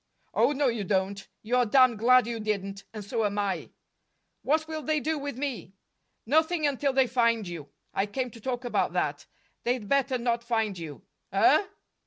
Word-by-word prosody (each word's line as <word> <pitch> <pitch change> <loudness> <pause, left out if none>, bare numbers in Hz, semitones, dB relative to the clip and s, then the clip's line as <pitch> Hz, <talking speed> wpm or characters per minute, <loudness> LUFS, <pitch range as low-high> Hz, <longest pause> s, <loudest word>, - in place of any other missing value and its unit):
"Oh, - - +3
no, 290 0 0
you 230 -4 -1
don't. 195 +1 -1 0.2
You're 245 +2 +2
damned 255 -1 +5
glad 255 +2 +5
you 235 0 -4
didn't, 200 -2 -3
and 215 -2 -7
so 225 +2 -1
am 205 0 -1
I." 200 -2 -1 0.7
"What 315 +3 +1
will 315 -1 -4
they 305 +2 0
do 310 +2 -1
with 285 -3 -5
me?" 255 -9 -4 0.5
"Nothing 315 +5 +2
until 280 0 +1
they 265 0 +4
find 230 -4 +1
you. 165 -5 -7 0.2
I 195 - 0
came 250 +4 -3
to 230 - -13
talk 250 +1 -3
about 240 - 0
that. - - -1 0.4
They'd 240 -3 -1
better 270 0 +2
not 235 -1 -1
find 225 -4 0
you." 160 -4 -8 0.3
"Huh!" 405 - +4
240 Hz, 180 wpm, -28 LUFS, 210-270 Hz, 0.7 s, damned